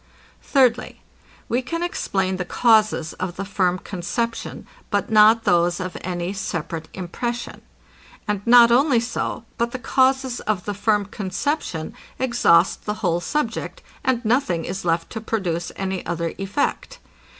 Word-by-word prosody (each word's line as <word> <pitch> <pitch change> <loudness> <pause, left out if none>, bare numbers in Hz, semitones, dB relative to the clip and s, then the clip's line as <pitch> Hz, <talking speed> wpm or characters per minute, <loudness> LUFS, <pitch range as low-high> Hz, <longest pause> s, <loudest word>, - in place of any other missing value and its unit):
Thirdly, 255 -4 +2 0.5
We 245 +2 0
can 335 +7 -3
explain 190 - -1
the 180 - -2
causes 215 -5 +2
of 180 -1 -3
the 195 - -4
firm 185 -2 +1
conception, 205 +6 -4 0.2
but 205 +1 -1
not 220 +1 +6
those 175 -2 +2
of 185 -1 -5
any 180 +1 -3
separate 165 -4 -4
impression. 235 +7 -4 0.7
And 210 -2 -1
not 235 0 +8
only 260 0 +4
so, 230 -1 -3
but 235 0 0
the - - -2
causes 260 -1 +1
of 205 -4 -2
the 205 - -2
firm 205 0 +1
conception 195 - -3 0.2
exhaust 235 -9 +3
the 210 - -2
whole 170 -1 +2
subject, 265 - -3 0.2
and 245 -2 0
nothing 215 - +1
is 185 +2 -4
left 165 -1 0
to 220 - -5
produce 180 -7 -2
any 190 -1 -3
other 170 -1 -3
effect. 240 - -2
205 Hz, 140 wpm, -22 LUFS, 180-240 Hz, 0.7 s, not